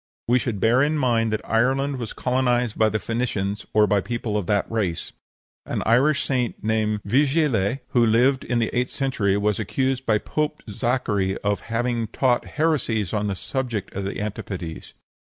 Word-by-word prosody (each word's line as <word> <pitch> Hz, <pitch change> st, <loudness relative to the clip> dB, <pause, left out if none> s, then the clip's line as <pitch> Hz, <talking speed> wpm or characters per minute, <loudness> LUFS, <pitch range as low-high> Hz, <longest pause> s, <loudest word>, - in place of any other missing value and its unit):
We 125 Hz, +2 st, +4 dB
should 115 Hz, -5 st, -3 dB
bear 120 Hz, +5 st, +4 dB
in 150 Hz, +2 st, +2 dB
mind 115 Hz, -5 st, +2 dB
that 110 Hz, 0 st, -3 dB
Ireland 135 Hz, +4 st, +1 dB
was 120 Hz, -3 st, -5 dB
colonized 125 Hz, -2 st, 0 dB
by 110 Hz, 0 st, +3 dB
the 110 Hz, -, 0 dB
Phoenicians 105 Hz, -3 st, -2 dB
(or 105 Hz, 0 st, +5 dB
by 100 Hz, -1 st, +2 dB
people 115 Hz, +1 st, -3 dB
of 105 Hz, -4 st, -1 dB
that 105 Hz, -1 st, +2 dB
race). 100 Hz, -7 st, -2 dB, 0.6 s
An -, -, -2 dB
Irish 135 Hz, +6 st, +3 dB
Saint 125 Hz, -4 st, -1 dB
named 110 Hz, -1 st, 0 dB
Vigile, 135 Hz, -, +2 dB
who 120 Hz, -, +3 dB
lived 125 Hz, +4 st, +3 dB
in 120 Hz, -, -1 dB
the 115 Hz, -1 st, 0 dB
eighth 125 Hz, +1 st, +1 dB
century, 115 Hz, -8 st, 0 dB
was 105 Hz, 0 st, 0 dB
accused 130 Hz, +4 st, -1 dB
to 110 Hz, -1 st, +3 dB
Pope 150 Hz, +4 st, -2 dB
Zachary 105 Hz, -4 st, 0 dB
of 100 Hz, 0 st, +1 dB
having 115 Hz, 0 st, 0 dB
taught 120 Hz, +2 st, +1 dB
heresies 125 Hz, -, +1 dB
on 105 Hz, -1 st, 0 dB
the 100 Hz, -, -2 dB
subject 120 Hz, -3 st, -4 dB
of 100 Hz, 0 st, -4 dB
the 100 Hz, -, -4 dB
antipodes. 95 Hz, -5 st, -6 dB
115 Hz, 175 wpm, -23 LUFS, 105-130 Hz, 0.6 s, or